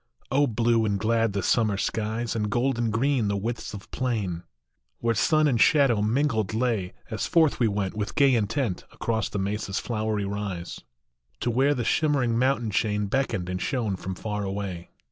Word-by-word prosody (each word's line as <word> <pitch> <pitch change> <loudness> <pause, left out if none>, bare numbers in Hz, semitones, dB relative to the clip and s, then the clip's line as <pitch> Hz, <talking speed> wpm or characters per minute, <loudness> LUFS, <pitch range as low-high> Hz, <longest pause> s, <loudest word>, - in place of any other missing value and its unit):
H, 140 0 +3
blue 115 0 +2
and 100 -2 +1
glad 115 0 +1
the 100 - -1
summer 110 -4 +2
skies, 110 +3 -2
And 105 -2 -1
golden 120 0 +1
green 120 +1 +1
the 100 0 0
widths 115 +1 -4
of 100 - -11
plain 105 -9 -2 0.6
Where 115 0 0
sun 155 +7 +3
and 120 -6 +2
shadow 135 -8 +4
mingled 110 -2 +1
lay, 110 -6 0 0.2
As 110 -3 -2
forth 160 -4 +3
we 120 - +4
went, 100 -2 -2
with 105 -1 -3
gay 140 -2 +5
intent, 115 -2 0
Across 110 -1 -2
the - - -4
Mesa 100 +2 -2
s 100 - -1
flowery 110 -3 -2
rise, 100 -3 -4 0.6
To 120 - 0
where 135 +5 +3
the 125 - -2
shimmering 140 -7 +2
mountain 125 -4 +1
chain 105 +1 0
Beckoned 100 -5 -1
and 90 0 -3
shone 115 -8 -1
from 95 0 -5
far 105 +1 -3
away 95 -3 -4
110 Hz, 180 wpm, -26 LUFS, 100-125 Hz, 0.6 s, gay